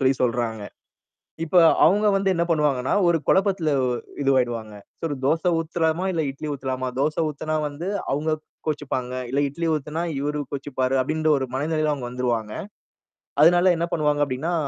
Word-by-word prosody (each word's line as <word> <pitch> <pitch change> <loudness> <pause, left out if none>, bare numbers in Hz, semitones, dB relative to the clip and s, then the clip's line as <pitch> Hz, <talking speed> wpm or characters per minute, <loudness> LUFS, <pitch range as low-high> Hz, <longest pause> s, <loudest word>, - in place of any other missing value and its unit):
சொல்லி 135 0 +3
சொல்றாங்க. 115 -3 -1 0.8
இப்ப 165 +3 -1 0.3
அவங்க 205 +3 +3
வந்து 195 -1 +2
என்ன 170 -1 +1
பண்ணுவாங்கன்னா, 145 -5 +1 0.2
ஒரு 170 -1 +3
குழப்பத்தில 190 -5 +2 0.5
இதுவாயிடுவாங்க. 120 -5 0 0.3
சோ - - -6
ஒரு 145 - -3
தோச 160 +3 +2 0.2
ஊத்தலாமா, 165 +1 0
இல்ல 165 -2 0
இட்லி 140 +3 -7
ஊத்தலாமா? 130 -1 -3
தோசை 150 +3 +1
ஊத்தனா 155 +1 -3
வந்து 150 +5 -6 0.2
அவுங்க 155 +3 0 0.3
கோச்சிப்பாங்க. 140 -4 -2 0.2
இல்ல 140 +2 +1
இட்லி 165 +4 -3
ஊத்தனா 155 +2 -3 0.2
இவரு 150 +1 -2
கோச்சிப்பாரு. 135 -2 -1
அப்டின்ற 155 +3 0
ஒரு 130 - -2
மனநிலையில 155 +1 0
அவங்க 130 -4 -6
வந்துருவாங்க. 120 -4 -2 0.9
அதனால 175 +3 +6
என்ன 170 +1 -1
பண்ணுவாங்க 150 -2 +2
அப்டின்னா. 140 +7 -2
150 Hz, 145 wpm, -24 LUFS, 130-165 Hz, 0.9 s, அதனால